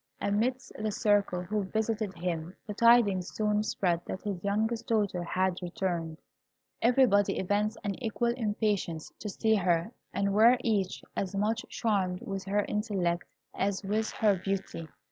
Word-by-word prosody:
Amidst 235 +6 0
the 215 0 -1
circle 200 -4 +1
who 205 +2 -1
visited 215 -1 -1
him 170 0 -3
the 210 - -5
tidings 210 -5 +4
soon 210 -1 +1
spread 180 -5 0
that 185 - -5
his 195 -4 -4
youngest 220 +3 0
daughter 205 -5 +1
had 185 +1 0
returned. 170 -3 -3 0.6
Everybody 235 -5 +4
evinced 205 +3 0
an 205 +4 -4
equal 235 +1 0
impatience 205 -8 -1
to 210 - -5
see 220 +2 +1
her, 180 -1 +1 0.2
and 200 +1 0
were 230 +4 +6
each 205 -6 0
as 195 0 -2
much 215 +3 0
charmed 190 -5 0
with 195 -1 -4
her 205 +1 +1
intellect 190 -5 -1 0.3
as 195 +1 -1
with 215 +3 0
her 205 -4 +2
beauty. 195 -4 -3
205 Hz, 145 wpm, -30 LUFS, 185-220 Hz, 0.6 s, were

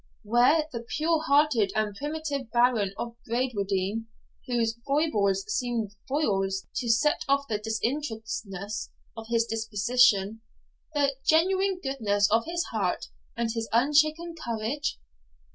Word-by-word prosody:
Where 250 +8 +4
the 235 - -4
pure 310 +7 0
hearted 280 -8 +3
and 215 -1 0
primitive 290 0 -4
Baron 240 -4 +3
of 235 -1 -5
Bradwardine, 220 -3 -1 0.4
whose 235 -2 0
foibles 210 -10 +2
seemed 240 -5 -1 0.2
foils 195 -9 0
to 240 - -2
set 280 +7 +3
off 280 0 +2
the 215 -2 -1
disinterestedness 220 -4 -3 0.3
of 225 -1 -8
his 230 -1 +2
disposition, 220 -1 +2 0.5
the 280 -1 +2
genuine 375 +4 +3
goodness 210 -7 +1
of 225 +1 +3
his 345 0 -1
heart, - - -1 0.3
and 230 -1 0
his 225 -1 -3
unshaken 305 +7 +3
courage? 235 +5 -2
235 Hz, 120 wpm, -27 LUFS, 215-285 Hz, 0.5 s, Where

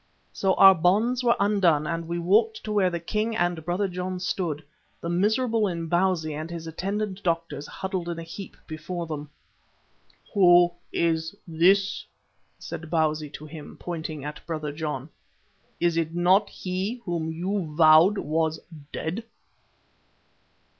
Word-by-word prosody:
So 190 -1 +1
our 195 0 +9
bonds 210 +9 +2
were 235 -1 +4
undone 190 -7 +3
and 165 0 -3
we 170 +1 -2
walked 215 +6 +2
to 215 - -4
where 200 -3 +3
the 170 -1 -3
king 215 +6 -2
and 175 -5 0
Brother 180 +4 0
John 180 0 -4
stood, 170 -4 -2 0.4
the 170 - -4
miserable 220 +5 +2
Imbozwi 170 -1 0
and 155 +2 -5
his 170 -1 -6
attendant 195 +4 -3
doctors 165 -4 -2
huddled 185 -2 -4
in 170 - -3
a 165 - -5
heap 190 +4 -9
before 170 +2 -5
them. 150 -2 -6 1.0
"Who 175 -3 +6 0.2
is 160 +1 0
this?" 190 +4 +3 0.5
said 160 0 -7
Bausi 155 -2 0
to 155 - -8
him, 155 -1 -10
pointing 160 -4 -5
at 150 0 -7
Brother 155 -3 -3
John. 150 -3 -4 0.7
"Is 170 -1 +1
it 165 0 -1
not 185 +4 +4
he 185 +5 -3
whom 165 -3 -2
you 180 0 -2
vowed 160 +5 +6
was 160 0 0 0.3
dead?" 175 +9 -3
175 Hz, 140 wpm, -26 LUFS, 160-195 Hz, 1.0 s, our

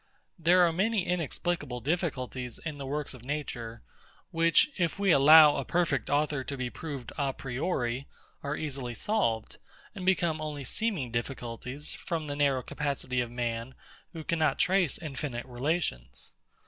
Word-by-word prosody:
There 175 +2 +6
are 165 - +1
many 200 +2 +1
inexplicable 175 -5 -2
difficulties 130 -5 -2
in 155 -3 -6
the 135 - -5
works 145 +1 -3
of 125 -2 -12
Nature, 125 -5 -4 0.5
which, 165 - +4
if 170 -3 0
we 200 -2 +3
allow 150 +1 +9
a 140 - -1
perfect 150 -6 0
author 145 -1 +1
to 140 +1 -5
be 125 -1 -3
proved 140 -6 -6
a 140 -2 +1
priori, 130 -1 -2 0.3
are 140 +1 -2
easily 135 -5 -3
solved, 115 - 0 0.4
and 190 - -7
become 170 -4 +2
only 150 -2 -4
seeming 160 - -1
difficulties, 125 +3 -4
from 165 -2 -3
the 145 -1 -4
narrow 140 -3 +2
capacity 140 -3 -2
of 120 - -3
man, 120 +1 -3 0.4
who 160 -2 -7
cannot 160 -1 +1
trace 185 -5 +2
infinite 135 -5 -4
relations. 120 - -2
145 Hz, 150 wpm, -29 LUFS, 125-165 Hz, 0.5 s, allow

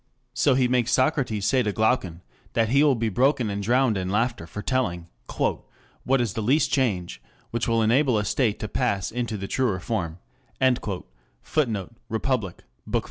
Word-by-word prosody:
So 130 +2 +3
he 130 -1 +3
makes 125 -1 +1
Socrates 130 -6 +1
say 130 +2 +3
to 105 -4 0
Glaucon 100 -6 0 0.3
that 115 -1 +2
he 140 +4 +4
will 145 -3 +4
be 115 -1 -1
broken 125 +1 +2
and 100 0 -3
drowned 120 0 +2
in 95 0 -3
laughter 110 -4 -1
for 105 - -7
telling 95 -11 -1 0.3
"what 135 +1 -2
is 115 -6 -1
the 110 - -3
least 140 +6 +2
change 100 -10 0 0.3
which 115 0 -1
will 115 -1 +2
enable 125 +2 +3
a 105 - 0
state 110 0 +1
to 110 - -2
pass 100 -5 -1
into 120 -2 -3
the 100 0 -5
truer 120 -7 0
form," 90 -7 -3 1.3
[Footnote: 115 -9 -1 0.2
Republic, 110 -4 -2 0.3
Bk. - - +2
115 Hz, 170 wpm, -25 LUFS, 100-130 Hz, 1.3 s, he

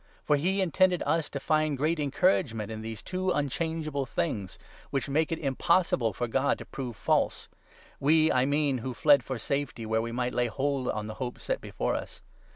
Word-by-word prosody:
For 150 - +4
he 185 +7 +1
intended 185 0 +3
us 160 +1 +1
to 140 - -4
find 155 0 +1
great 155 +4 +1
encouragement 140 - +1
in 110 0 -5
these 110 -1 -6
two 185 0 -2
18 180 - +1
unchangeable 150 -1 -2
things, 105 - -2 0.3
which 135 -4 -1
make 155 +4 +1
it 165 - 0
impossible 145 -4 +2
for 120 +5 -3
God 135 +4 +1
to - - -9
prove 125 -4 -6
false 100 - 0 0.3
— - - -26
we, 155 +2 +4
I 130 0 +3
mean, 145 -2 +1
who 125 +1 -5
fled 145 0 +5
for 130 - -4
safety 135 -1 -2
where 110 +1 +1
we 115 +1 -4
might 125 +1 -1
lay 125 0 +1
hold 135 +3 -1
on 105 0 -2
the 110 - -5
hope 125 -1 -3
set - - -2
before - - -2
us. - - -5
140 Hz, 200 wpm, -28 LUFS, 120-160 Hz, 0.3 s, fled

